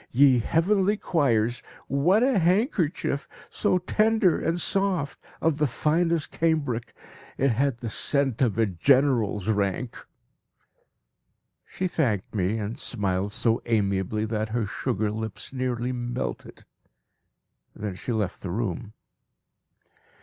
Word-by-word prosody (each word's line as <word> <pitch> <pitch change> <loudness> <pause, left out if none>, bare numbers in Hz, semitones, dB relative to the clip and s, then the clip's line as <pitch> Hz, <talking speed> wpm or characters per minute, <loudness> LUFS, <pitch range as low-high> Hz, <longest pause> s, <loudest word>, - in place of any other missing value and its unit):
Ye 130 0 +5
heavenly 190 - +2
choirs, 120 - +1 0.3
what 175 - +3
a 260 -5 +3
handkerchief! 170 - 0 0.2
So 185 - +2
tender 210 0 +2
and 165 +2 -1
soft, 185 -6 0 0.2
of 160 -3 +1
the 150 -1 +2
finest 165 +4 0
cambric. 145 -8 -1 0.4
It 135 - +2
had 130 +2 +1
the 120 -1 -5
scent 140 +1 +1
of 115 -5 +2
a 115 - +4
general's 110 - +2
rank! 105 +3 -1 1.7
She 185 - -2
thanked 115 - -1
me, 100 +1 0
and 110 +1 -4
smiled 100 -3 -2
so 115 +2 +1
amiably 105 -1 0
that 110 0 -2
her 115 0 -1
sugar 105 +1 -2
lips 110 +3 -6
nearly 125 -1 -2
melted. 120 0 -5 1.1
Then 105 -2 -4
she 95 - -5
left 105 -5 -2
the 95 - -5
room. 105 +2 -3
125 Hz, 120 wpm, -26 LUFS, 110-160 Hz, 1.7 s, Ye